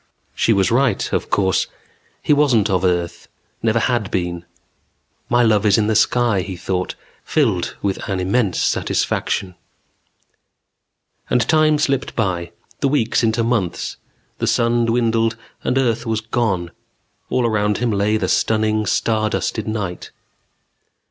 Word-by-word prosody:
_" - - -41 0.3
She - - +1
was 100 +1 +2
right, 120 -3 +1
of - - -1
course. 95 -2 +1 0.6
He - - +3
wasn't 125 -8 +3
of 95 -1 +1
earth. 85 -2 -1 0.3
Never 115 0 +1
had 115 -3 0
been. 85 -1 -3 0.8
My 120 0 +3
love 110 -3 +3
is 105 -2 +4
in 110 - +2
the 110 - +1
sky, 120 -3 +2
he 95 -1 -6
thought, 90 +1 -3 0.3
filled 110 - 0
with 100 -2 -1
an 95 -1 -1
immense 95 +1 0
satisfaction. 95 -2 -1 1.8
And 125 -2 +2
time 155 -1 +4
slipped 135 -3 -1
by, 90 -6 -1 0.3
the 140 - +1
weeks 120 -5 +1
into 115 0 +1
months; 115 -7 -1 0.4
the - - -1
sun 115 0 +2
dwindled 115 -1 +1 0.3
and 130 - 0
earth 120 -3 0
was 110 -1 0
gone. 110 -6 -1 0.6
All 125 - +1
around 105 -2 +1
him 120 -1 0
lay 105 +1 +1
the - - -1
stunning 110 -1 +1
star 110 0 +1
dusted 110 0 -2
night. 105 -5 -4
110 Hz, 140 wpm, -20 LUFS, 95-120 Hz, 1.8 s, is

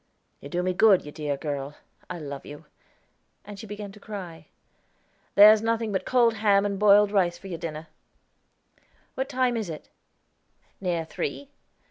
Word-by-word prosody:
"You 140 - -10
do 175 +4 -2
me 185 0 0
good, 195 -2 +4
you 150 - -8
dear 145 -2 -3
girl; 145 -1 -5 0.3
I 180 - -5
love 140 -3 -7
you"; 145 0 -11 0.8
and 205 -1 -10
she 220 - -9
began 205 0 -7
to 210 - -15
cry. 175 -7 -9 0.9
"There's 210 +1 +8
nothing 225 -1 -1
but 190 - -2
cold 240 -2 +3
ham 200 -1 +3
and 200 -1 -2
boiled 205 0 +5
rice 180 -4 +1
for 195 - -18
your 175 -4 -6
dinner." 160 -2 -6 1.3
"What 265 +1 -3
time 255 -3 +1
is 220 -6 -3
it?" 155 -2 -8 0.9
"Near 175 -4 -2
three." 280 - -5
195 Hz, 160 wpm, -26 LUFS, 165-215 Hz, 1.3 s, There's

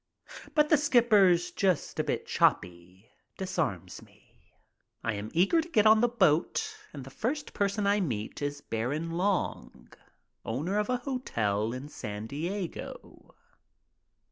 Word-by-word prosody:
But 300 -1 +4
the 305 - +6
skipper's 210 -11 +4
"just 185 -4 0
a - - +2
bit - - -2
choppy" 90 +4 -1 0.3
disarms 155 - -3
me. - - -23 0.5
I 115 - 0
am 105 +1 -5
eager 195 - +3
to 330 - -10
get 215 -9 +3
on 215 0 +7
the 240 - +4
boat, 185 -10 +1 0.2
and 140 -3 -8
the 135 - -11
first 275 - -3
person 200 0 0
I 200 +1 +3
meet 115 - -3
is 145 0 -3
Baron 145 +10 -3
Long, 185 +3 -2 0.5
owner 155 - -1
of 210 - -1
a 250 - +1
hotel 115 - -2
in 130 +3 -6
San 105 -7 -6
Diego. 175 - -6
175 Hz, 140 wpm, -29 LUFS, -, 0.5 s, on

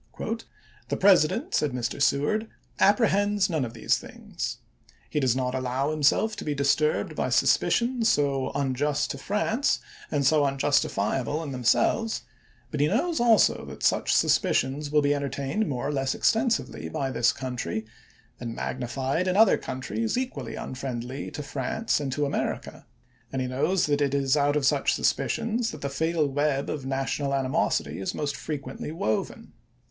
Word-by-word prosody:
"The - - -1
President," 185 -6 +3
said 150 -4 +1
Mr. 125 +2 -3
Seward, 180 +12 +2 0.3
"apprehends 205 -2 +3
none 155 -4 0
of 120 -1 -5
these 115 - +1
things. - - -6 0.5
He 150 - +1
does 130 -4 +2
not 125 -1 -1
allow 130 +2 -1
himself 155 +9 +2
to - - -5
be 150 -1 -2
disturbed 140 +2 +1
by - - -1
suspicions 235 -1 +2
so 140 -6 +1
unjust 140 +2 0
to 140 - -6
France 215 - 0 0.3
and 140 -2 0
so 150 +1 +4
unjustifiable 135 0 0
in 145 - -5
them 125 -2 -5
selves; 225 - +2 0.5
but 150 - -3
he 145 - +4
knows, 315 - 0
also, 230 -3 +4
that - - -9
such - - +2
suspicions 140 +3 +2
will 150 0 +3
be 145 0 +3
entertained 140 +7 -2
more 130 0 -2
or - - -2
less 135 -1 0
extensively 225 0 0
by 135 -1 -2
this 120 -2 +3
country, 120 -6 -4 0.5
and 115 -1 -5
magnified 135 +7 -2
in 185 +1 +1
other 220 +1 +6
countries 115 - -3
equally 255 0 -4
unfriendly 130 0 -5
to 150 - -6
France 145 - -1
and 140 -2 -3
to 145 +3 0
America; 140 - -3 0.4
and 135 - -2
he 130 - -1
knows 150 +9 +1
also - - -3
that 145 0 +2
it 140 -1 +1
is 135 -1 +2
out 145 0 +2
of 150 -2 +1
such - - +2
suspicions 230 0 0
that 155 - -8
the 140 - -2
fatal 160 +2 0
web 140 0 0
of 135 -3 -5
national 135 +1 -1
animosity 130 -6 0
is 95 - -3
most 145 -1 -2
fre 155 - -5
quently 140 +1 -6
woven." 110 -9 -3
145 Hz, 165 wpm, -26 LUFS, 130-165 Hz, 0.5 s, other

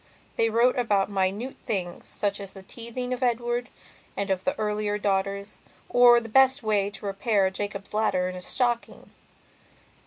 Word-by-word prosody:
They 225 - +2
wrote 240 +3 +3
about 205 -4 +1
minute 200 +6 -1
things 185 -6 -3
such 200 0 -2
as 195 -1 -8
the 195 - -11
teething 240 +4 -5
of 250 - -5
Edward 240 0 0 0.5
and 200 -1 -1
of 190 -1 -1
the 275 - 0
earlier 210 -1 -1
daughters 200 0 -1 0.3
or 245 -1 +7
the 230 - -8
best 265 +3 +4
way 205 -2 +1
to 205 - -11
repair 200 0 +1
a 190 - +1
Jacob's 200 +1 -5
ladder 210 -4 +1
in 185 - -5
a 180 - -7
stocking. 240 +4 -2
210 Hz, 165 wpm, -26 LUFS, 195-240 Hz, 0.5 s, or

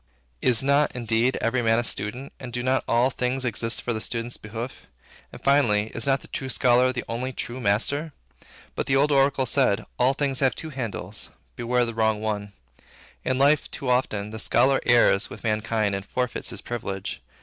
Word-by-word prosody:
Is 125 -1 +3
not, 140 +1 +2
indeed, 120 +1 +1
every 120 +2 +1
man 115 -1 +3
a 120 - +1
student, 120 +5 -2
and 125 -2 -7
do 120 +1 -3
not 130 +1 +1
all 120 +3 +3
things 125 +1 -1
exist 115 0 0
for 120 - -1
the 110 - -4
student's 115 +1 -3
behoof? 115 +4 -7 0.4
And, - - -10
finally, 115 -7 +3
is 120 +3 -1
not 135 -1 +2
the - - -13
true 135 - -4
scholar 125 0 +4
the 125 -1 -4
only 125 +3 -3
true 125 0 -5
master? 130 +8 0 0.6
But - - -3
the 135 - +2
old 145 +2 +3
oracle 135 -1 +3
said, 125 -5 +2
`All 130 +2 +3
things 140 -3 0
have 130 -2 +2
two 160 - -6
handles: 105 -6 -3 0.3
beware 125 +1 0
of - - +3
the 115 - -4
wrong 110 -1 +1
one.' 105 -1 -3 0.7
In 130 - 0
life, 140 +2 +3
too 135 - -3
often, 105 -5 0
the 110 - -6
scholar 130 +4 +3
errs 120 -4 +4
with - - -10
mankind 110 -1 0
and 100 0 -3
forfeits 125 +3 -3
his - - -5
privilege. 100 -5 -5
120 Hz, 195 wpm, -25 LUFS, 110-130 Hz, 0.7 s, scholar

